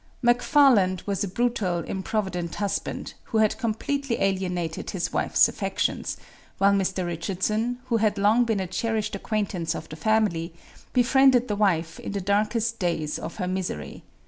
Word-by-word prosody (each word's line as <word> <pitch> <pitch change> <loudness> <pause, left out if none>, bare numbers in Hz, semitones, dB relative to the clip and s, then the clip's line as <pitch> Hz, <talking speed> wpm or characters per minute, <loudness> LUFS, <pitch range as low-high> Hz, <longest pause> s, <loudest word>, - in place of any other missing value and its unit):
McFarland 240 - +4
was 200 0 -1
a - - -1
brutal, 195 -4 0
improvident 190 -2 -3
husband, 205 -1 -3
who 225 - -2
had 215 -1 +2
completely 245 +3 -1
alienated 180 -4 -1
his 185 -4 -3
wife's - - +4
affections, - - -2 0.4
while 200 0 +4
Mr. 190 -2 0
Richardson, 195 +7 -1
who 235 -2 +1
had 215 -1 +1
long 210 +4 +4
been 225 -4 0
a 190 - -1
cherished 215 +3 -2
acquaintance 185 -6 -2
of - - -6
the 155 - -7
family, 170 -3 0 0.4
befriended 255 0 +4
the 210 - -1
wife 170 -6 +1
in - - -6
the 200 - -1
darkest 215 +4 0
days 165 -5 -1
of - - -6
her 180 -3 -3
misery. 185 0 -4
200 Hz, 150 wpm, -25 LUFS, 180-225 Hz, 0.4 s, McFarland